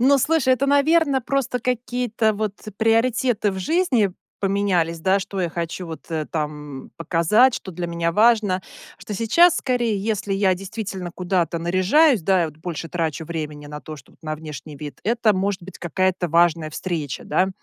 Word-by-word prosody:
Ну, 275 +3 +5
слушай, 270 -2 +3
это, 275 +2 -1
наверно, 285 0 +3
просто 255 -1 -1
какие-то 245 -2 0
вот 210 -1 -2 0.2
приоритеты 225 -1 +2
в 190 - -5
жизни 245 - +1 0.3
поменялись, 190 -5 +1
да, 190 +3 +3
что 195 0 -6
я 175 -3 0
хочу 170 +1 -4
вот, 160 -1 -9
э, 155 -2 -1
там 150 -3 -5
показать, 175 - +3
что 190 - -6
для 175 +1 -4
меня 170 0 -1
важно, 210 -2 +3 0.3
что 195 +2 -8
сейчас 320 - +4
скорее, 240 -5 0
если 205 -2 -1
я 195 -1 +3
действительно 195 -1 -6
куда-то 175 -2 0
наряжаюсь, 185 - +3
да, 185 -1 +3
и - - -1
вот 150 - -10
больше 165 0 -6
трачу 160 -2 -3
времени 150 -3 -5
на 150 0 -7
то, 155 -1 -8
чтоб 130 - -17
вот - - -48
на 155 -1 -3
внешний 150 -1 -9
вид, 145 0 -8
это 225 -1 +2
может 190 -1 -1
быть 190 - -10
какая-то 185 +1 0
важная 165 -1 +2
встреча, 155 -5 -4
да. 185 +5 +1
190 Hz, 175 wpm, -22 LUFS, 165-230 Hz, 0.3 s, Ну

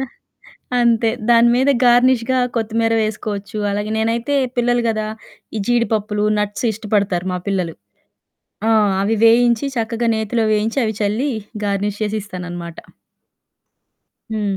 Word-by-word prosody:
దా 265 - -2 0.7
అంతే 230 -1 +3 0.2
దాని 235 0 +6
మీద 265 +2 +3
గార్నిష్‌గా 245 +1 +4 0.2
కొత్తిమీర 225 0 0
వేసుకోవచ్చు. 215 -1 -4
అలాగే 205 +1 -2
నేనైతే 230 +5 0 0.2
పిల్లలు 245 0 +2
గదా 215 -1 -1 0.5
ఈ - - -1
జీడిపప్పులు 215 -3 0
నట్స్ 210 +3 -2
ఇష్టపడతారు 200 -4 -1
మా 180 - -2
పిల్లలు. 180 -4 -1 0.9
ఆ! - - +4 0.3
అవి 220 +3 +1
వేయించి 235 +3 +4
చక్కగా 230 +1 -1
నేతిలో 220 +1 -1
వేయించి 220 +5 0
అవి 220 - -2
చల్లి 215 +8 0 0.3
గార్నిష్ 205 +1 -2
చేసి 215 0 -1
ఇస్తాననమాట. 175 -3 -7 1.5
హ్మ్. 205 -3 -1
220 Hz, 120 wpm, -19 LUFS, 205-235 Hz, 1.5 s, దాని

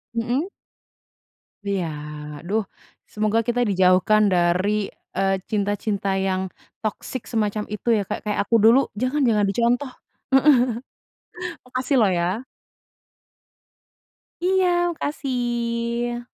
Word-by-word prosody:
Mhm. 245 +9 -1 1.2
Iya, 195 -3 0 0.5
aduh. 205 +8 -1 0.5
Semoga 215 +1 +1
kita 240 0 +1
dijauhkan 190 +2 +4
dari, 185 +4 +2 0.3
eee, 195 0 +2
cinta-cinta 205 -1 -1
yang 190 -1 0 0.4
toxic 220 +3 -4
semacam 215 -2 -1
itu 210 +2 -7
ya, 205 - 0
Kak, - - -4
kayak 210 -1 -2
aku 230 - +3
dulu, 230 +4 +7 0.2
jangan 255 +7 0
jangan 210 -3 +3
dicontoh 240 +6 +1 0.4
heeh. 270 +2 +6 1.1
Makasih 255 +2 -1
loh 215 - +5
ya. 180 +5 0 2.0
Iya, 355 -1 +2
makasih. 240 -4 -2
220 Hz, 100 wpm, -23 LUFS, 200-245 Hz, 2.0 s, dulu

